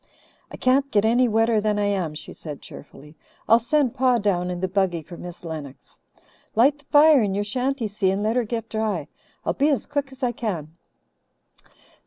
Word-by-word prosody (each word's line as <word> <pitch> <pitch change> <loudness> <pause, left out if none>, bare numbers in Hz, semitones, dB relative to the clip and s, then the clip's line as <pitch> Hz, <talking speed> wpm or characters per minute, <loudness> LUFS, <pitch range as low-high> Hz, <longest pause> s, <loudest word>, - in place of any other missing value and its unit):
"I - - -9
can't 270 +2 +2
get 210 -4 +2
any 240 +3 +4
wetter 225 0 +2
than 210 0 0
I 205 - +1
am," 185 -6 -1
she - - -8
said 150 -3 -8
cheerfully. 150 +2 -13 0.3
"I'll 230 +1 +6
send 260 +1 +1
Pa 255 -1 +3
down 185 -5 0
in 180 -1 -4
the 185 - -1
buggy 185 -3 0
for 175 - -11
Miss 175 0 -10
Lennox. 155 -5 -9 0.6
Light 275 +6 +4
the 285 - -20
fire 295 -1 +6
in 200 -3 0
your 205 - 0
shanty, 250 +3 -1
Si, 205 -2 0
and 195 +2 -1
let 220 +2 0
her 250 - +2
get 225 0 -4
dry. 210 -9 -2 0.4
I'll - - +1
be 290 +2 +2
as 280 - 0
quick 285 -2 -3
as 265 0 -12
I 245 - +2
can." 175 -10 -5
215 Hz, 200 wpm, -23 LUFS, 185-255 Hz, 0.6 s, I'll